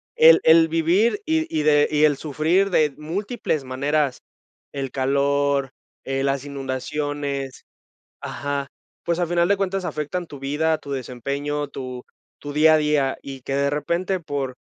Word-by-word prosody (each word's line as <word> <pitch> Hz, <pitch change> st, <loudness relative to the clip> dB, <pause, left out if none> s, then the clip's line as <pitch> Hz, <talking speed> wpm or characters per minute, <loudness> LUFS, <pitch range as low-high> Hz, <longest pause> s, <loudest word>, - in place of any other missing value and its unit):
el 480 Hz, +1 st, +8 dB
el 160 Hz, 0 st, +6 dB
vivir 170 Hz, -, +2 dB
y 320 Hz, 0 st, 0 dB
y 155 Hz, -, +1 dB
de 145 Hz, -1 st, +4 dB
y 150 Hz, 0 st, +4 dB
el 145 Hz, -2 st, +3 dB
sufrir 160 Hz, +7 st, +1 dB
de 155 Hz, -5 st, +3 dB
múltiples 165 Hz, -, -3 dB
maneras, 140 Hz, +1 st, 0 dB, 0.5 s
el 135 Hz, -2 st, -4 dB
calor, 140 Hz, 0 st, +1 dB, 0.3 s
eh, 135 Hz, 0 st, -1 dB
las 140 Hz, 0 st, -1 dB
inundaciones 140 Hz, 0 st, -4 dB, 0.6 s
ajá. 140 Hz, -1 st, -3 dB, 0.4 s
Pues, 170 Hz, +1 st, 0 dB
a 175 Hz, -, +1 dB
final 175 Hz, 0 st, +2 dB
de 200 Hz, +2 st, +3 dB
cuentas, 195 Hz, -1 st, -2 dB
afectan 170 Hz, +4 st, -3 dB
tu 145 Hz, -3 st, -11 dB
vida, 155 Hz, +3 st, 0 dB
tu 140 Hz, -, -11 dB
desempeño, 140 Hz, +3 st, -3 dB
tu 130 Hz, -2 st, -7 dB, 0.4 s
tu 145 Hz, -, -6 dB
día 155 Hz, +2 st, +5 dB
a -, -, +6 dB
día 150 Hz, -3 st, +1 dB
y 135 Hz, -2 st, -8 dB
que 135 Hz, -, -4 dB
de 140 Hz, 0 st, +1 dB
repente, 170 Hz, +6 st, -1 dB
por 140 Hz, -5 st, -4 dB
145 Hz, 155 wpm, -23 LUFS, 140-165 Hz, 0.6 s, el